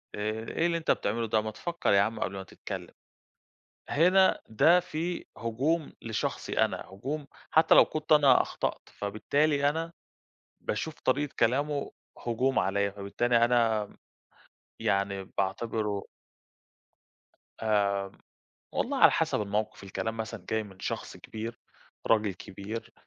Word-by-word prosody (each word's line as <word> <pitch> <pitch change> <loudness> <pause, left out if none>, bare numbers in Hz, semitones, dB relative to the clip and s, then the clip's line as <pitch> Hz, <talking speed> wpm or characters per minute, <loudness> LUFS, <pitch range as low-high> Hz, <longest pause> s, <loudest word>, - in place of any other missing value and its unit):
آآ 110 +2 -2
إيه 165 - 0
اللي 170 -1 +2
أنت 165 - +1
بتعمله 115 +3 0
ده، 110 0 +2
ما 110 0 -4
تفكّر 170 +10 -2
يا 100 - +6
عم 110 +3 -1
قبل 100 - -2
ما 95 -1 -5
تتكلّم. 95 -1 -8 1.0
هنا 185 +5 +4
ده 165 +11 +5
فيه 175 0 -3
هجوم 140 +8 -1
لشخصي 115 -2 -2
أنا - - +3
هجوم 140 +10 -5 0.2
حتى 160 - +6
لو - - +9
كنت 155 0 -2
أنا 145 -4 +7
أخطأت، - - -3 0.2
فبالتالي 140 +8 +1
أنا 165 +3 -2 0.7
باشوف 155 +9 -2
طريقة 140 +2 +1
كلامه 140 +4 +1 0.4
هجوم 130 +3 +1
عليّا 100 +1 +1
فبالتالي 115 +4 +1
أنا 115 -3 +3
م - - -19 0.8
يعني 100 0 0
باعتبره 105 +1 -1 1.6
آمم، 105 -2 +3 0.8
والله - - -1
على - - +8
حسب - - +1
الموقِف 105 0 -2
الكلام 110 +3 -4
مثلًا 110 -3 -5
جاي 110 0 0
من 95 -3 -14
شخص - - -4
كبير 115 +1 -7 0.5
راجل 105 -3 +3
كبير، 100 +5 -7
115 Hz, 130 wpm, -29 LUFS, 105-145 Hz, 1.6 s, لو